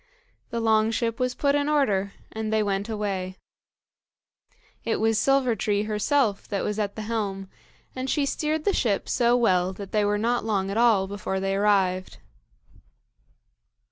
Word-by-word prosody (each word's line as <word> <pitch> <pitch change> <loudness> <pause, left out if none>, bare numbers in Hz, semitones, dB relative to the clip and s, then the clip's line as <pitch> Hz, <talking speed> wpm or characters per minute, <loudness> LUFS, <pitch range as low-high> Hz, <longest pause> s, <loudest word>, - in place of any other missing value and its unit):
The 235 - -3
long 220 -1 +3
ship 230 0 -1
was 250 0 0
put 280 -1 +1
in 290 0 +1
order, 205 -10 +1 0.2
and 220 0 -4
they 220 -1 +2
went 200 +1 -2
away. 195 -4 -3 1.5
It 230 - -1
was 225 0 +2
Silver 270 -3 +2
tree 205 0 0
herself 215 +1 0
that 200 -2 -2
was 210 +1 -2
at 205 -1 -2
the 220 - -5
helm, 205 -3 -3 0.5
and 260 +1 -3
she 290 0 +1
steered 305 +2 -1
the 405 - +3
ship 210 - 0
so 240 0 +3
well 185 -5 +2
that 195 0 -9
they 210 -1 +2
were 205 0 +1
not 235 +3 0
long 195 -3 -1
at 205 - -2
all 225 -5 +4
before 190 -1 -3
they 195 0 -1
arrived. 195 -2 +1
215 Hz, 165 wpm, -25 LUFS, 200-235 Hz, 1.5 s, all